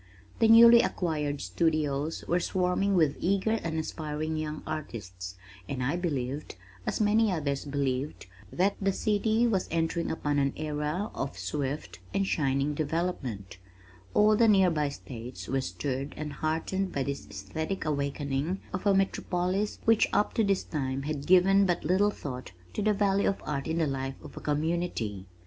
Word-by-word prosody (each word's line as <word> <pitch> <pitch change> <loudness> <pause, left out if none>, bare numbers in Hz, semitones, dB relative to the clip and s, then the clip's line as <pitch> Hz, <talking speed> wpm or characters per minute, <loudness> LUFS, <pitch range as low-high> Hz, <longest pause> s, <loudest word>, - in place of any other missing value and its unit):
The 225 - +5
newly 230 +1 +9
acquired 150 - -1
studios 150 - 0
were 175 - +2
swarming 185 +2 +1
with 155 -5 +3
eager 200 +4 +1
and 160 -1 -3
aspiring 155 0 -3
young 155 -1 -4
artists, 95 - -6 0.3
and 130 -2 -2
I 140 +6 +1
believed, 145 - -3 0.3
(as - - -1
many 215 0 +3
others 145 -5 -1
believed) 140 -2 -2 0.3
that 195 +3 +2
the 195 0 +2
city 220 +3 +2
was 200 -6 +1
entering 165 +1 0
upon 145 -2 0
an 140 -1 +1
era 150 +5 -2
of 135 - -4
swift 145 0 -3 0.2
and 195 0 +2
shining 140 -3 +1
development. 145 - -3 0.6
All 215 +1 +6
the 230 +2 +5
near 190 -4 +5
by 150 -3 0
states 125 -3 -8
were 135 0 0
stirred 135 +1 -3
and 150 -1 -4
heartened 165 +6 -1
by 135 - -1
this 140 +1 -4
esthetic 160 - -4
awakening 140 +3 -1
of 185 +3 -2
a 200 - +5
metropolis 190 +1 0
which 225 -1 +4
up 210 - +2
to 225 - +2
this 195 -2 +1
time 135 -3 -3
had 145 -1 -4
given 195 +2 +6
but 175 -1 0
little 190 +5 +3
thought 125 - -6 0.2
to - - -2
the 210 +1 +3
value 200 -1 +2
of 195 - -4
art 140 -1 -2
in 160 +1 -1
the 165 - +2
life 135 -1 -3
of - - -11
a - - -6
community. 150 - -1
155 Hz, 165 wpm, -29 LUFS, 140-190 Hz, 0.6 s, newly